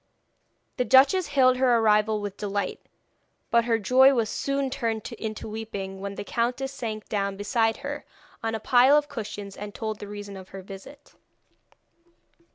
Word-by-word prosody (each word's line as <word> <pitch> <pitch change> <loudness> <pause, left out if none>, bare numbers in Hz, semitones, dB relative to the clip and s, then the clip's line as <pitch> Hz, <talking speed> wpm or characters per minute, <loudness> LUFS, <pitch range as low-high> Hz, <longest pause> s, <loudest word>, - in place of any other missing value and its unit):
The 250 - +2
duchess 275 +8 +5
hailed 255 -2 +4
her 250 -2 +4
arrival 215 -1 +3
with 205 -1 -5
delight, 200 -2 -3 0.7
but 235 0 +4
her 230 -1 +2
joy 260 +6 +5
was 225 -3 0
soon 275 -1 -1
turned 225 -4 -2
into 215 -1 -5
weeping 205 -3 -6
when 200 0 -5
the - - -5
countess 245 +5 -2
sank 220 -5 -5
down 200 -2 -2
beside 225 +2 +1
her - - -4 0.4
on 225 0 -2
a - - -3
pile 255 +6 +5
of 295 -1 +1
cushions, 205 -6 -7
and 205 0 -8
told 220 -2 -4
the 205 - -7
reason 205 -1 -8
of 190 -1 -11
her 195 -1 -9
visit. 195 +10 -12
220 Hz, 165 wpm, -26 LUFS, 205-255 Hz, 0.7 s, duchess